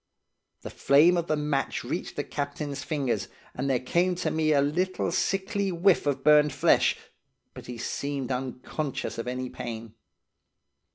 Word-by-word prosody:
The - - -6
flame 155 +6 +5
of 170 -1 -1
the 155 - +1
match 150 -2 -1
reached - - -4
the - - -2
captain's 145 0 -4
fingers, 140 -6 -1 0.3
and 135 +2 -2
there 130 -2 +2
came 175 +8 +1
to 175 - -2
me 155 -1 +1
a 145 - +4
little 175 +6 0
sickly 195 +2 0
whiff 175 -2 +3
of 140 - 0
burned 150 -1 +5
flesh, 140 - +3 0.6
but - - -11
he 125 -1 -6
seemed 140 +2 -3
unconscious 130 +2 -4
of 115 - -4
any 125 +1 -3
pain. 115 -3 -7
145 Hz, 155 wpm, -27 LUFS, 130-170 Hz, 0.6 s, flame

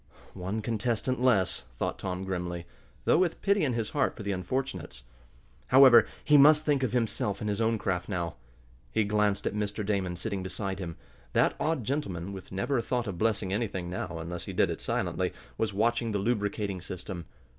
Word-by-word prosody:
"One 95 +4 -3
contestant 120 +2 0
less," 95 - +3
thought - - -2
Tom, 90 0 -3
grimly, 90 -2 -3 0.4
though - - +5
with 180 -3 +1
pity 200 -2 +3
in 135 -4 +1
his 115 -2 -2
heart 140 -3 +1
for 110 - -6
the 100 - -1
unfortunates. 90 - -3 0.6
However, 130 -3 +8 0.2
he 150 - +6
must 150 +2 +7
think 145 -3 +2
of 130 - 0
himself 115 -3 0
and 105 - -3
his 105 +1 -1
own 115 0 +2
craft 90 -3 -2
now. 85 -4 -2 0.6
He 110 - +2
glanced 105 -1 +1
at - - 0
Mr. 105 0 -2
Damon 95 -4 0
sitting 100 +2 -3
beside 95 +1 -3
him. 85 -4 -5 0.4
That - - +3
odd 155 -4 0
gentleman, 100 - -3
with 95 -2 -9
never 95 +8 0
a - - +1
thought 120 0 -1
of 95 -5 -5
blessing 105 -3 +1
anything 95 -5 -2
now, 85 -2 -4
unless 85 +1 -5
he - - -6
did - - +2
it - - -5
silently, - - -1 0.3
was 110 - +1
watching 115 +2 +1
the - - +1
lubricating 100 -3 -1
system. 90 -1 -6
105 Hz, 190 wpm, -29 LUFS, 95-120 Hz, 0.6 s, However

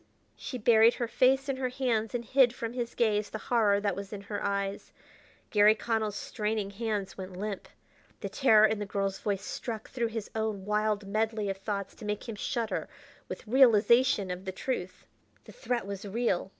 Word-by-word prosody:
She 255 - -6
buried 230 0 +5
her 240 - -2
face 265 +3 +3
in 270 -1 -1
her 255 -1 -1
hands 245 -4 -1
to 245 - -1
hide 250 +1 +4
from 230 -1 -4
his 240 -2 -4
gaze 210 -3 +1
the - - -5
horror 215 -3 +2
that 200 -2 -1
was 200 0 -7
in 205 -2 -6
her 205 0 -5
eyes. 200 0 -2 0.6
Garry 210 0 +6
Connell's 220 -2 -1
straining 210 -2 -2
hands 210 -2 -3
went 185 -1 -7
limp. 205 0 -4 0.5
The - - -4
terror 220 -6 +5
in 220 -1 +1
the 205 - -4
girl's 195 -1 -2
voice 200 -1 -2
struck 225 -3 -5
through 240 -2 -1
his 225 -2 -6
own 220 -3 -2
wild 210 0 0
medley 215 0 -1
of 195 - -6
thoughts 200 0 -4
to 215 - -11
make 210 +3 -3
him 225 - -5
shudder 225 +2 -2 0.4
with - - -7
realization 235 -3 +4
of 180 +1 -6
the 190 - -3
truth. 185 -2 -4 0.4
The - - -13
threat 250 - -2
was 200 -1 -6
real! 205 -3 -1
215 Hz, 190 wpm, -29 LUFS, 200-235 Hz, 0.6 s, Garry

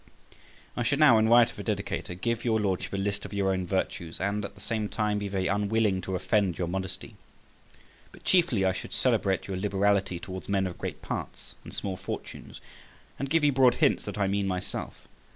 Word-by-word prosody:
I - - -2
should 140 +4 +1
now, 140 -7 +7
in 110 +1 +3
right 120 0 +7
of 115 - -11
a - - -4
dedicator, 100 -4 -3
give 115 +2 -1
your 110 -2 +2
Lordship 95 -3 -1
a - - -1
list 100 +1 -2
of - - -8
your 95 -1 +2
own 95 -1 -1
virtues, 85 -3 -2
and 100 +2 -1
at 100 - -6
the - - -15
same 110 -2 -2
time 105 -1 0
be 100 - -3
very 95 -1 -1
unwilling 105 -1 +1
to 95 +1 -3
offend 95 -1 +1
your 90 - -1
modesty; 95 +4 -5 0.9
but - - -16
chiefly 165 - +3
I 95 - +4
should - - -7
celebrate 95 -2 +1
your 95 -2 -4
liberality 100 -1 +1
towards 95 +1 -7
men 100 -1 +2
of 90 -2 -5
great - - -5
parts - - -6
and - - -10
small 95 -2 -4
fortunes, - - -7 0.6
and 140 - -2
give 165 +1 +2
you 145 - +5
broad 130 -2 +5
hints - - +2
that - - -5
I 100 - +2
mean 100 0 0
myself. 90 -1 -5
100 Hz, 205 wpm, -28 LUFS, 95-110 Hz, 0.9 s, now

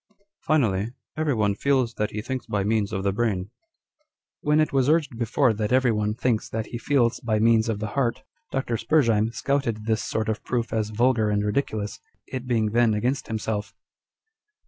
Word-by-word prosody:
" 200 - -61
Finally, 110 -9 +2 0.3
every 155 -4 0
one 100 -2 +2
feels 130 +1 +1
that 105 -2 -1
he 105 0 -5
thinks 130 +1 -4
by 100 -1 0
means 105 0 0
of 95 - -2
the 100 - +2
brain." 100 -3 -1 0.5
* 310 +1 -51
When 150 +1 +3
it 155 - +1
was 135 0 +3
urged 155 -5 +2
before, 120 +2 +2
that 105 +1 -2
every 130 -1 +4
one 105 -1 0
thinks 120 -2 0
that 110 -1 -3
he 120 - -6
feels 120 -4 +2
by 110 -2 0
means 115 +1 +3
of 110 - 0
the 105 0 -4
heart, 125 0 0 0.3
Dr. 120 -3 -1
Spurzheim 115 -4 +2
scouted 120 -5 -1
this 110 -1 +1
sort 110 -1 -2
of 110 -1 -2
proof 120 -2 -2
as 110 -1 0
vulgar 115 0 +2
and 105 0 +1
ridiculous, 105 -2 -2 0.3
it 130 -1 -6
being 110 -4 +1
then 115 -1 +3
against 125 +6 -1
himself. 105 -2 -3
115 Hz, 190 wpm, -25 LUFS, 105-130 Hz, 0.5 s, every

